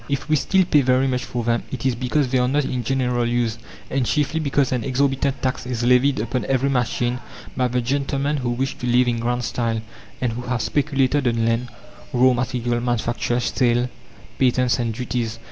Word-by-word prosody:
If 140 0 -2
we 155 - +3
still 190 +5 +2
pay 150 -4 +4
very 130 0 +3
much 125 -1 -1
for 120 -1 -3
them, 115 0 +1
it 130 -1 -5
is 130 - +3
because 130 +3 0
they 130 0 +2
are 125 - +2
not 145 +2 +1
in 125 -2 -2
general 125 -2 0
use, 120 -2 0 0.3
and 135 -1 0
chiefly 150 +5 0
because 140 -3 +1
an 125 -3 0
exorbitant 135 0 0
tax 130 -1 -1
is 125 -2 -2
levied 125 +3 +4
upon 120 +1 -2
every 135 +2 +1
machine 125 -1 0 0.4
by 125 -1 +1
the 125 0 0
gentlemen 140 +3 -1
who 125 -3 -2
wish 130 +3 -1
to 125 - -3
live 125 +1 +4
in 120 -1 0
grand 120 +1 -1
style 115 -1 -1 0.4
and 120 -3 -1
who 120 - -5
have 125 -3 -1
speculated 140 -1 +1
on 115 -1 +1
land, 115 +2 0 0.5
raw 130 +1 +5
material, 120 0 -1
manufacture, 120 0 0
sale, 120 0 +1 0.5
patents, 125 -1 +2
and 115 -2 -1
duties. 120 -2 -3
125 Hz, 195 wpm, -22 LUFS, 120-135 Hz, 0.5 s, raw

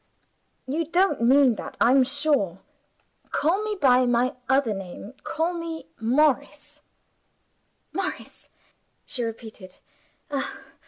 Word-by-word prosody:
You 305 +6 -2
don't 360 -3 +2
mean 260 +1 +5
that, - - -8
I'm 260 +3 +5
sure. 275 - +1 0.7
Call 350 +8 +1
me 430 -1 -2
by 255 -3 +4
my 245 +1 +2 0.2
other 265 -4 +3
name 195 +3 -8
call 330 +3 -1
me 335 -1 -6
'Morris.'" 265 +5 0 1.1
"Morris?" 385 -1 -5 0.6
she 250 - -3
repeated. 220 -4 -8
265 Hz, 100 wpm, -25 LUFS, 235-320 Hz, 1.1 s, mean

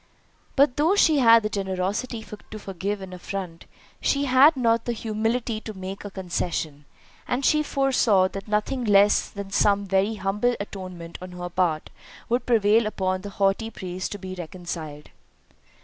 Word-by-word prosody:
But 275 -2 +4
though 320 +7 +3
she 315 -7 +4
had 230 -3 +7
the - - +1
generosity 200 +4 -2 0.3
to 215 - -7
forgive 200 0 -4
an 185 -1 -9
affront, 180 -2 -6 0.3
she 280 0 +1
had 270 +3 +6
not 230 -2 +2
the 240 - -1
humility 225 +1 -2
to 220 -2 -8
make 190 +1 -6
a 205 - -6
concession; 170 -6 -3 0.4
and 260 +2 -1
she 305 - +4
foresaw 260 -10 +2
that 195 +2 -7
nothing 215 +5 -1
less 205 -1 +4
than 200 -1 -8
some 200 0 +3
very 195 +3 +1
humble 210 +5 0
atonement 185 -4 -7
on 185 0 -8
her 175 0 -5
part 175 -3 -1 0.4
would 240 +1 0
prevail 220 -1 +4
upon 185 -3 -1
the 205 - -7
haughty 200 +3 +1
priest 185 -3 -5
to - - -5
be 190 -1 -7
reconciled. 165 -4 -7
200 Hz, 160 wpm, -25 LUFS, 185-230 Hz, 0.4 s, had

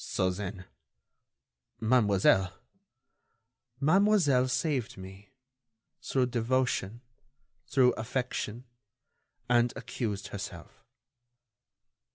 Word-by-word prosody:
"So, 95 -1 0
then... 95 0 -6 1.1
Mademoiselle...." 100 -5 +3 1.3
"Mademoiselle 160 -5 +4
saved 130 -4 -1
me... 95 +2 -11 0.7
through 130 -2 +1
devotion... 120 -2 -1 0.7
through 130 -2 +4
affection... 120 0 -3 0.8
and 120 -1 +3
accused 105 -4 -4
herself...." 95 -4 -8
120 Hz, 65 wpm, -29 LUFS, 100-130 Hz, 1.3 s, Mademoiselle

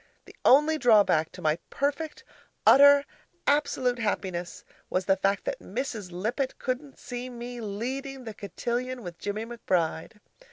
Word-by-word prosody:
The - - -15
only 300 +4 +5
drawback 205 -10 +4
to 180 - -10
my 155 +1 +2
perfect, 290 +2 -2 0.4
utter, 285 +1 +8 0.4
absolute 260 -4 +1
happiness 185 -5 -3 0.3
was 185 0 0
the 195 - +4
fact 195 +1 0
that - - -2
Mrs. 220 -4 -5
Lippett 230 +9 -2
couldn't 260 +2 -4
see 245 0 -6
me 240 0 -7
leading 260 +6 -4
the 225 -2 -7
cotillion 240 +5 -4
with 175 -2 -8
Jimmie 210 +2 -3
McBride. 180 -9 -1
240 Hz, 135 wpm, -27 LUFS, 195-265 Hz, 0.4 s, utter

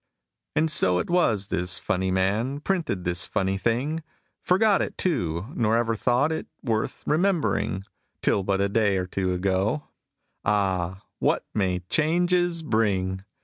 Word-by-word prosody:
And 155 +1 +2
so 90 -12 +3
it 90 - -2
was 110 - +2
this 90 0 0
funny 95 -3 -1
man 105 +9 0
Printed 160 - -1
this 85 -1 +1
funny 95 0 0
thing 130 +9 0 0.4
Forgot 200 +3 +3
it, - - -3
too, 90 - -1
nor 115 0 +2
ever 115 -1 +1
thought 125 +7 +2
It 160 - -3 0.2
worth 110 -3 -2
remembering, 160 - +1 0.4
Till 100 - +2
but 95 0 0
a 100 - +3
day 100 -1 +2
or 90 - -1
two 95 0 -2
ago. 95 +9 0 0.5
(Ah! 95 -2 0 0.2
what - - +1
may 95 -4 0
changes 175 - +1
bring!) 95 -7 0
105 Hz, 145 wpm, -25 LUFS, 95-155 Hz, 0.5 s, so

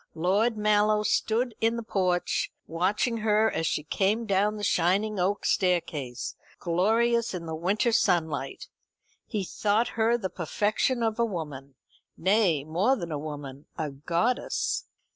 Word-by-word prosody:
Lord 205 +7 +1
Mallow 210 0 +3
stood 230 +3 +1
in 225 +1 +2
the 235 - -4
porch, 185 -4 0
watching 195 +8 0
her 220 0 +2
as 165 - -1
she 150 - -1
came 205 +8 0
down 205 +1 +1
the 205 - -6
shining 195 +4 +1
oak 195 +3 0
staircase, 160 -9 -1 0.2
glorious 225 +6 +1
in 170 -2 -5
the 160 - -5
winter 195 +9 +1
sunlight. 160 - 0 0.6
He 210 -4 -2
thought 210 +5 0
her 230 +1 +2
the 190 -6 -4
perfection 210 - 0
of 225 0 -1
a 235 - +4
woman 145 -9 -6 0.4
nay, 185 -6 +2
more 180 - +2
than 170 -8 -6
a 150 - -2
woman, 145 -2 -7
a 155 -2 -2
goddess. 170 - -1
195 Hz, 140 wpm, -27 LUFS, 165-220 Hz, 0.6 s, a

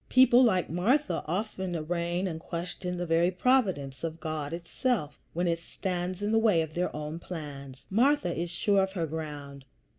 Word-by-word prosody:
People 255 -1 +7
like 185 -8 +3
Martha 240 - +1
often 190 0 -2
arraign 170 +3 -1
and 165 -4 -3
question 180 +2 -4
the 175 - -2
very 165 +1 +3
providence 185 - +1
of 165 0 -3
God 155 -2 -3
itself 170 - -2
when 175 +2 0
it 165 -1 +1
stands 180 +2 -3
in 205 - 0
the 225 - +4
way 210 -8 +4
of 155 -1 -8
their 180 +2 0
own 150 +2 -4
plans. 140 -6 -8
Martha 230 - +2
is 170 +1 -2
sure 195 +3 +2
of 190 0 -1
her 170 -4 -1
ground. 145 -3 -6
175 Hz, 175 wpm, -29 LUFS, 160-195 Hz, -, People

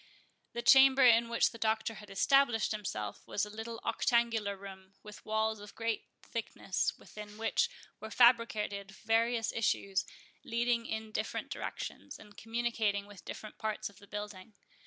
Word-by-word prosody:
The 235 - -3
chamber 265 0 +7
in 235 -1 +6
which 235 - +3
the 230 - -11
Doctor 220 0 0
had 210 -1 -11
established 240 +2 +3
himself 105 - -4
was 205 - 0
a 210 - -10
little 225 +1 -6
octangular 230 -3 +1
room, 190 0 -11
with 210 -1 -11
walls 220 0 0
of 205 0 -11
great 230 -1 -2 0.2
thickness, 215 -4 -2
within 210 0 -11
which 225 - +1 0.3
were 220 - -7
fabricated 215 -5 +3
various 225 +2 +1
issues, 200 -3 0 0.4
leading 235 0 0
in 220 0 -4
different 215 +1 -3
directions, - - -6
and 205 0 -15
communicating 225 -2 -1
with 205 -2 -13
different 215 - -8
parts 215 -2 -3
of 200 - -20
the 200 - -16
building. 205 0 -7
220 Hz, 150 wpm, -32 LUFS, 205-230 Hz, 0.4 s, chamber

